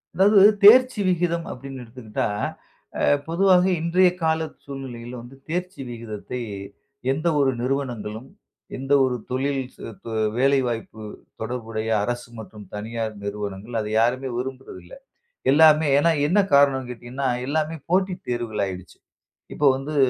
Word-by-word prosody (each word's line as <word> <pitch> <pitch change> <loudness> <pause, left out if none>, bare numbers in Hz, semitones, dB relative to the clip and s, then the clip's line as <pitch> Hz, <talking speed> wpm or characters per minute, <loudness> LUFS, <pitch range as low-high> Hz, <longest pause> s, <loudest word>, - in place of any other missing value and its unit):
அதாவது 200 +3 +5 0.2
தேர்ச்சி 250 +3 +8
விகிதம் 170 -1 0
அப்பிடின்னு 135 0 -8
எடுத்துக்கிட்டா, 115 -2 -4 0.7
அ - - 0 0.2
பொதுவாவே 185 +2 +4
இன்றைய 180 +2 +4
கால 160 0 +2 0.3
சூழ்நிலையில 125 -4 -8
வந்து 120 +3 -13
தேர்ச்சி 180 0 -3
விகிதத்தை 115 0 -6 0.7
எந்த 155 +5 -1
ஒரு 135 -2 +3
நிறுவனங்களும், 125 -3 -3 0.5
எந்த 135 +2 -1
ஒரு 130 -1 +1 0.2
தொழில் 135 +2 0
ச - - -28 0.2
து 115 - -7 0.3
வேலைவாய்ப்பு 125 -5 0 0.4
தொடர்புடைய 110 -1 -4
அரசு 120 +3 -3
மற்றும் 105 -1 -10
தனியார் 110 +1 -4
நிறுவனங்கள் 100 +2 -5
அதை 105 0 -5
யாருமே 130 +3 0
விரும்புறதில்ல. 130 - -7 0.6
எல்லாமே 155 +1 +6
ஏன்னா 165 +3 +4 0.2
என்ன 185 +7 +3
காரணன்னு 135 -3 +4
கேட்டீங்கன்னா, 125 +3 -4 0.2
எல்லாமே 155 +2 -1
போட்டி 185 +1 +2 0.2
தேர்வுகள் 120 -3 -2
ஆகிடுச்சு. 90 -2 -8 0.6
இப்போ 150 - -1
வந்து, 145 +3 -5
130 Hz, 120 wpm, -23 LUFS, 115-160 Hz, 0.7 s, தேர்ச்சி